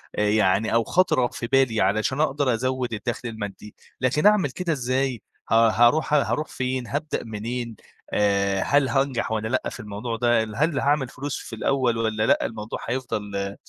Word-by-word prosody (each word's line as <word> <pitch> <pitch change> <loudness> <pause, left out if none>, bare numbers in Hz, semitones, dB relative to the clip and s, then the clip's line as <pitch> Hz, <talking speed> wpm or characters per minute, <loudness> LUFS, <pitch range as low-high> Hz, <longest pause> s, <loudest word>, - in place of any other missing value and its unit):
آآ 105 0 +1
يعني 105 0 +2
أو 115 0 +3
خطرت 130 -6 +2
في 120 - -4
بالي 130 -4 +2
علشان 110 +8 +1
أقدر 140 -4 +1
أزوّد 130 0 -2
الدخل 120 +3 -4
المادي، 105 -1 -7 0.3
لكن 135 +6 +1
أعمل 210 -7 +5
كده 175 +3 -2
إزاي 130 -2 -1 0.3
ه - - +1 0.2
هاروح 120 +8 +3
هاروح 150 +1 +1
فين 130 -1 -3
هابدأ 150 +2 -3
منين، 115 +2 -5 0.4
آآ، 100 -1 +2
هل 140 -2 +2
هانجح 135 -4 0
والّا 110 0 -1
لأ 130 +3 -1
في - - -10
الموضوع 105 +3 -5
ده، 120 -1 +3
هل 140 +8 -1
هاعمل 140 -1 +1
فلوس 140 +2 -5
في 115 - -8
الأول 125 0 +1
والّا 110 -1 0
لأ؟ - - +3
الموضوع 110 0 -5
هيفضل 105 -5 -3
120 Hz, 165 wpm, -24 LUFS, 110-135 Hz, 0.4 s, أعمل